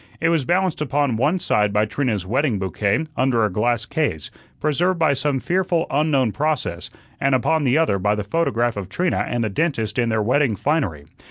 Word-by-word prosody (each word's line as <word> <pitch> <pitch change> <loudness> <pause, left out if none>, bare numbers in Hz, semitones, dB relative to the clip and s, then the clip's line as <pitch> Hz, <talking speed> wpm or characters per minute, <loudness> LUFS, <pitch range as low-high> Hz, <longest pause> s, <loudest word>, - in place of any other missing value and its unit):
It 165 - +1
was 165 -5 +1
balanced 180 -1 0
upon 145 -3 0
one 145 +10 +1
side 105 - +1
by 105 +1 +2
Trina's 110 -5 -2
wedding 125 +2 0
bouquet 100 +9 -1
under 125 -5 +2
a 105 - -2
glass 115 +3 0
case, 130 - -2 0.3
preserved 170 +5 +1
by 160 -3 +3
some 140 0 -1
fearful 175 +1 0
unknown 140 -5 +2
process, 150 +3 -2 0.3
and 135 -1 +2
upon 155 +4 +1
the 130 +3 +3
other 155 -12 +2
by 105 +2 +1
the 105 - -3
photograph 120 -2 0
of 95 -2 -5
Trina 180 - 0
and 120 -1 -1
the 110 - -1
dentist 115 - -1
in 120 -1 +1
their 110 -1 +1
wedding 125 0 +2
finery. 100 - -1
130 Hz, 190 wpm, -21 LUFS, 105-155 Hz, 0.3 s, by